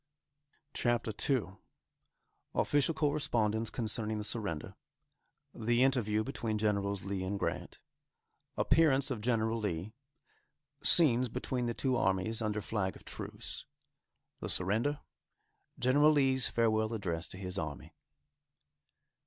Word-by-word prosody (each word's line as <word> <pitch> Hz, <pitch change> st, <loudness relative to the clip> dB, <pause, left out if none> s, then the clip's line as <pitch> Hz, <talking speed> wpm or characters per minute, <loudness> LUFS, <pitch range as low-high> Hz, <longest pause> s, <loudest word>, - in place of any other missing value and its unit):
CHAPTER 120 Hz, -2 st, 0 dB, 0.2 s
II. 100 Hz, -9 st, 0 dB, 1.0 s
Official 145 Hz, +2 st, +2 dB
Correspondence 115 Hz, -8 st, 0 dB
Concerning 110 Hz, -2 st, -2 dB
the 105 Hz, -, -3 dB
Surrender 100 Hz, -8 st, -3 dB, 0.8 s
The 120 Hz, +2 st, +2 dB
Interview 110 Hz, -5 st, +2 dB
Between 115 Hz, -4 st, -3 dB
Generals 100 Hz, -2 st, 0 dB
Lee 95 Hz, -1 st, -3 dB
and 100 Hz, +2 st, -2 dB
Grant -, -, -3 dB, 0.8 s
Appearance 140 Hz, -3 st, +3 dB
of 115 Hz, -5 st, -3 dB
General 115 Hz, -1 st, +1 dB
Lee 100 Hz, 0 st, -3 dB, 0.9 s
Scenes 130 Hz, -7 st, +6 dB
Between 125 Hz, +2 st, -2 dB
the 120 Hz, -, -2 dB
Two 130 Hz, -2 st, 0 dB
Armies 95 Hz, +3 st, 0 dB
Under 105 Hz, -1 st, -1 dB
Flag 100 Hz, -3 st, -2 dB
of -, -, -15 dB
Truce -, -, -6 dB, 0.7 s
The -, -, -5 dB
Surrender 110 Hz, +11 st, 0 dB, 0.8 s
General 145 Hz, +5 st, +5 dB
Lee's 135 Hz, -3 st, +3 dB
Farewell 110 Hz, -1 st, +1 dB
Address 85 Hz, -5 st, -3 dB
to -, -, -9 dB
His 95 Hz, -1 st, -4 dB
Army. 80 Hz, -3 st, -6 dB
110 Hz, 110 wpm, -32 LUFS, 100-130 Hz, 1.0 s, Scenes